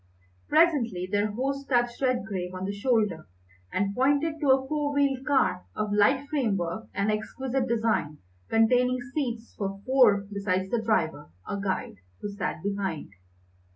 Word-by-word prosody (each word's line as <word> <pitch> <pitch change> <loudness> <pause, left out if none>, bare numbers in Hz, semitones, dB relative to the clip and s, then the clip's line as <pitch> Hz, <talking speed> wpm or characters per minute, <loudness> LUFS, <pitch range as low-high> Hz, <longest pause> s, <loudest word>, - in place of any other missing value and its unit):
Presently 265 - +3
their 205 +1 +1
host 275 +5 -3
touched 240 -1 +1
Redgrave 200 -8 -1
on 185 +1 -4
the 200 - -2
shoulder 210 -6 0 0.4
and 200 +1 0
pointed 285 +6 +1
to 290 -3 +1
a 265 0 +4
four 295 -1 -1
wheeled 280 -2 +1
car 185 -11 +2
of 215 -1 -1
light 265 +7 +3
framework 220 - -1
and 200 +2 0
exquisite 255 +4 -2
design, 220 - 0 0.3
containing 250 +3 +3
seats 235 -6 -3
for 195 -1 -4
four 245 -7 +4
besides 190 -1 -1
the 235 - +1
driver, 165 -9 0 0.2
or 200 - -3
guide, 190 - -2 0.2
who 205 - -4
sat 200 -2 -4
behind. 195 - -3
225 Hz, 145 wpm, -27 LUFS, 200-265 Hz, 0.4 s, a